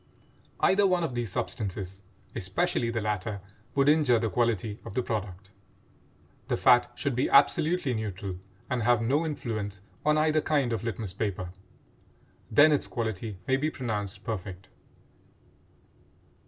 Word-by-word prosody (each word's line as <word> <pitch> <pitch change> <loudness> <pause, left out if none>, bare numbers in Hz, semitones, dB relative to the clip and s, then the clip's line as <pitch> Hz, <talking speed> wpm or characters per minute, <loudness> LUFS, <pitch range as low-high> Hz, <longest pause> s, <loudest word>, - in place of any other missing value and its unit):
Either 200 +1 +4
one 180 -2 +2
of 160 - -2
these 120 -4 -2
substances, 95 -2 -4 0.3
especially 115 - 0
the 115 -2 -2
latter, 105 -1 -2 0.4
would 140 0 +3
injure 145 -5 +5
the 110 -2 -1
quality 110 -1 0
of 115 - -9
the 125 - +1
product. 100 -4 -4 1.0
The - - 0
fat 120 0 +5
should 140 - -1
be 125 - +1
absolutely 150 +1 +4
neutral 100 -4 -4 0.3
and 130 -2 -1
have 120 0 +4
no 140 +7 +2
influence 110 -10 -4 0.2
on 150 0 +3
either 155 0 +3
kind 140 -7 +1
of 110 - -2
litmus 110 -4 -4
paper; 95 -3 -3 1.0
then 145 +7 +6
its 145 - +1
quality 110 -3 -3
may 135 - +3
be 150 +3 0
pronounced 105 -9 -4
perfect. 95 -3 -5
115 Hz, 140 wpm, -28 LUFS, 100-140 Hz, 1.0 s, then